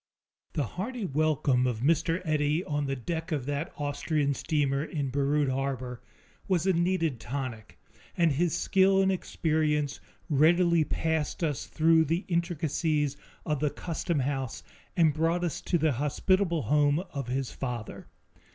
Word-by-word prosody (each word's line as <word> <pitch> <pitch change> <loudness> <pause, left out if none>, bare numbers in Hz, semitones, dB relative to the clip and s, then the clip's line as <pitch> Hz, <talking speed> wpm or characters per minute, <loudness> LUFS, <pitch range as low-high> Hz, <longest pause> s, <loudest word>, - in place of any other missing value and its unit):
The 150 - 0
hearty 210 - -4
welcome 145 -4 +2
of 115 -3 -2
Mr. 165 +5 +1
Eddy 155 +1 +1
on 145 -1 -1
the 135 - -1
deck 165 +6 -4
of 145 -5 -1
that 145 +3 -3
Austrian 145 0 0
steamer 140 -1 0
in 145 -4 -3
Beirut 145 +1 +1
harbor 130 -2 -3 0.5
was 180 -3 +1
a 190 - +3
needed 170 -6 +1
tonic, 120 -3 -5 0.4
and 170 -3 +4
his 160 +4 +1
skill 195 -1 +3
and 195 0 +3
experience 155 -5 0 0.3
readily 170 +3 +4
passed 160 +2 -1
us 150 -4 -1
through 160 0 +4
the 165 +6 -1
intricacies 160 -4 0 0.3
of 150 -3 0
the 150 +1 +1
customhouse 140 -6 -2 0.3
and 160 -3 +5
brought 165 +3 +1
us 170 - -2
to 175 - +1
the 155 -1 +2
hospitable 165 - +1
home 145 0 +3 0.2
of 140 -4 -4
his 130 +1 -2
father. 120 -5 -5
150 Hz, 140 wpm, -28 LUFS, 140-170 Hz, 0.5 s, and